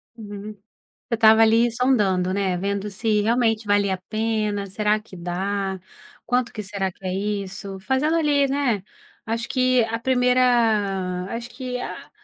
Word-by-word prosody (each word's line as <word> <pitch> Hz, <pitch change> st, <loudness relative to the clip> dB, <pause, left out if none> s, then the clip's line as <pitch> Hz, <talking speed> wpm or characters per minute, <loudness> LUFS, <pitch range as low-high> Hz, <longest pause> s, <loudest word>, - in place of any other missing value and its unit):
Uhum. 210 Hz, -1 st, -8 dB, 0.4 s
Você 230 Hz, -, -7 dB
estava 220 Hz, 0 st, +6 dB
ali 230 Hz, +2 st, +4 dB
sondando, 205 Hz, -7 st, +1 dB
né, 190 Hz, -3 st, 0 dB
vendo 200 Hz, +2 st, -2 dB
se 210 Hz, +1 st, 0 dB
realmente 225 Hz, 0 st, +1 dB
valia 205 Hz, -1 st, +2 dB
a 185 Hz, -, -6 dB
pena, 215 Hz, -2 st, -1 dB
será 210 Hz, +2 st, +1 dB
que 210 Hz, -3 st, -13 dB
dá, 190 Hz, +2 st, -2 dB, 0.5 s
quanto 245 Hz, -1 st, 0 dB
que 215 Hz, -, -6 dB
será 195 Hz, -1 st, -2 dB
que 190 Hz, -, -22 dB
é 185 Hz, -, -1 dB
isso, 195 Hz, -1 st, -4 dB
fazendo 270 Hz, +9 st, +1 dB
ali, 290 Hz, -3 st, +2 dB
né, 260 Hz, -8 st, 0 dB, 0.4 s
acho 230 Hz, +1 st, -3 dB
que 255 Hz, -2 st, +3 dB
a 230 Hz, +1 st, -3 dB
1ª 225 Hz, -7 st, +2 dB
acho 235 Hz, +1 st, -5 dB
que 250 Hz, -1 st, -5 dB
a -, -, -7 dB
215 Hz, 150 wpm, -23 LUFS, 195-240 Hz, 0.5 s, estava